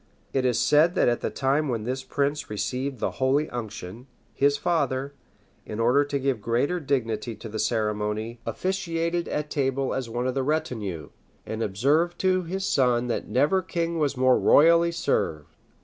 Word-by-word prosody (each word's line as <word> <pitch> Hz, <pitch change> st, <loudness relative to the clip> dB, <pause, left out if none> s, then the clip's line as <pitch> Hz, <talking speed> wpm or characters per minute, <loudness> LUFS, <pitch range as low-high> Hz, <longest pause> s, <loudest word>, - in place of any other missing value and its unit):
It 130 Hz, -1 st, +1 dB
is 125 Hz, -2 st, +2 dB
said 160 Hz, +4 st, +4 dB
that -, -, +3 dB
at 120 Hz, -1 st, +1 dB
the -, -, -1 dB
time 140 Hz, +2 st, 0 dB
when 115 Hz, -3 st, -2 dB
this 130 Hz, +3 st, -3 dB
prince 145 Hz, +2 st, -1 dB
received 130 Hz, +5 st, -3 dB
the -, -, -1 dB
holy 140 Hz, +4 st, +2 dB
unction, 110 Hz, 0 st, -7 dB, 0.3 s
his 140 Hz, +1 st, +2 dB
father, 140 Hz, -5 st, -1 dB, 0.5 s
in 105 Hz, -, -7 dB
order 125 Hz, +5 st, +4 dB
to 145 Hz, 0 st, -2 dB
give 135 Hz, -4 st, -1 dB
greater 125 Hz, -, 0 dB
dignity 120 Hz, -6 st, -2 dB
to 115 Hz, -, -9 dB
the 110 Hz, 0 st, -5 dB
ceremony, 110 Hz, +1 st, -1 dB
officiated 170 Hz, -2 st, -2 dB
at 150 Hz, 0 st, -3 dB
table 135 Hz, -1 st, 0 dB
as 130 Hz, -3 st, -3 dB
one 120 Hz, +2 st, -2 dB
of 130 Hz, -, 0 dB
the 135 Hz, -, 0 dB
retinue; 110 Hz, -, -2 dB, 0.4 s
and 110 Hz, +1 st, -4 dB
observed 140 Hz, -, +1 dB
to 185 Hz, -1 st, +2 dB
his 190 Hz, +3 st, -4 dB
son 125 Hz, -5 st, +2 dB
that 115 Hz, -, -2 dB
never 150 Hz, +9 st, +2 dB
king 170 Hz, -2 st, -2 dB
was 145 Hz, -3 st, 0 dB
more 130 Hz, 0 st, +4 dB
royally 170 Hz, +2 st, +5 dB
served. 75 Hz, -, -2 dB
135 Hz, 170 wpm, -25 LUFS, 115-155 Hz, 0.5 s, royally